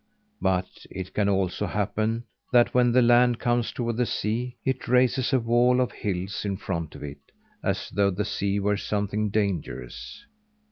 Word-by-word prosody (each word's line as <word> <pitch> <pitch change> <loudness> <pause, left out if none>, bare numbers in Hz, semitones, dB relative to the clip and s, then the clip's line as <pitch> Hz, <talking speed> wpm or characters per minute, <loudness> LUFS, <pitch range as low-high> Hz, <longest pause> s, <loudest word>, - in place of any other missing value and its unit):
But 90 -1 -1
it 95 0 -7
can 100 -1 +1
also 95 +1 0
happen 110 +3 -1 0.3
that, 120 -2 +4
when 125 -1 +4
the 125 +1 +5
land 120 0 +5
comes 120 -1 +1
toward 120 -2 -2
the 125 -1 +1
sea, 120 +4 -2
it 130 -1 -1
raises 125 +1 +3
a 130 - +4
wall 120 +2 +3
of 125 - +1
hills 95 -1 -3
in 100 -2 -2
front 85 -6 -4
of - - -9
it 70 0 -7 0.4
as - - -1
though 100 -1 +2
the 100 +2 -2
sea 100 -1 -1
were 105 +1 +1
something 105 +1 -1
dangerous. 100 - -3
105 Hz, 170 wpm, -26 LUFS, 100-120 Hz, 0.4 s, the